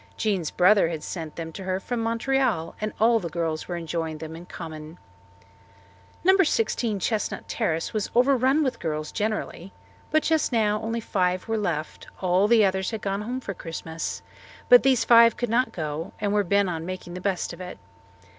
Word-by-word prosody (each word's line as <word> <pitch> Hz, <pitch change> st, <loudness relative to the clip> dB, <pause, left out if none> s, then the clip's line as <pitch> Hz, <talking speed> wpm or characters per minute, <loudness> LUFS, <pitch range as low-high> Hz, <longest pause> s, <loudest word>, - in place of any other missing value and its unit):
Jean's 190 Hz, -7 st, 0 dB
brother 185 Hz, -1 st, +4 dB
had 160 Hz, -3 st, -5 dB
sent 160 Hz, -4 st, -6 dB
them 165 Hz, -1 st, -6 dB
to 190 Hz, -, -8 dB
her 185 Hz, 0 st, -1 dB
from 240 Hz, +5 st, -3 dB
Montreal, 230 Hz, -6 st, 0 dB
and 215 Hz, 0 st, -1 dB
all 230 Hz, +1 st, +4 dB
the 175 Hz, -5 st, -5 dB
girls 165 Hz, -1 st, -3 dB
were 175 Hz, -, -3 dB
enjoying 165 Hz, -1 st, -3 dB
them 160 Hz, +1 st, -7 dB
in 170 Hz, +2 st, -11 dB
common. 160 Hz, -1 st, -8 dB, 1.3 s
No. 380 Hz, +2 st, +6 dB
16 230 Hz, -, +1 dB
Chestnut 215 Hz, +3 st, -2 dB
Terrace 165 Hz, -8 st, -1 dB
was 215 Hz, -2 st, -1 dB
overrun 265 Hz, +3 st, +4 dB
with 260 Hz, -, -2 dB
girls 155 Hz, -2 st, -3 dB
generally. 210 Hz, -4 st, -3 dB, 0.4 s
But 310 Hz, 0 st, +2 dB
just 320 Hz, -3 st, +1 dB
now 215 Hz, -3 st, +1 dB
only 230 Hz, +1 st, -2 dB
five 185 Hz, -2 st, 0 dB
were 225 Hz, -, 0 dB
left; 170 Hz, -8 st, -3 dB
all 185 Hz, +2 st, +2 dB
the 225 Hz, -2 st, +5 dB
others 190 Hz, 0 st, 0 dB
had 220 Hz, -2 st, -5 dB
gone 195 Hz, 0 st, -1 dB
home 250 Hz, +4 st, -4 dB
for 200 Hz, -, -5 dB
Christmas, 165 Hz, -1 st, -5 dB, 0.5 s
but -, -, +9 dB
these 255 Hz, -4 st, +3 dB
five 230 Hz, -1 st, +7 dB
could 245 Hz, -, -2 dB
not 250 Hz, +3 st, +2 dB
go 155 Hz, 0 st, -4 dB
and 205 Hz, -1 st, 0 dB
were 205 Hz, -1 st, +3 dB
bent 200 Hz, +1 st, +2 dB
on 165 Hz, -3 st, -3 dB
making 180 Hz, 0 st, -6 dB
the 180 Hz, -, -6 dB
best 190 Hz, -2 st, -1 dB
of 170 Hz, -, -10 dB
it. 180 Hz, 0 st, -7 dB
195 Hz, 185 wpm, -25 LUFS, 170-230 Hz, 1.3 s, but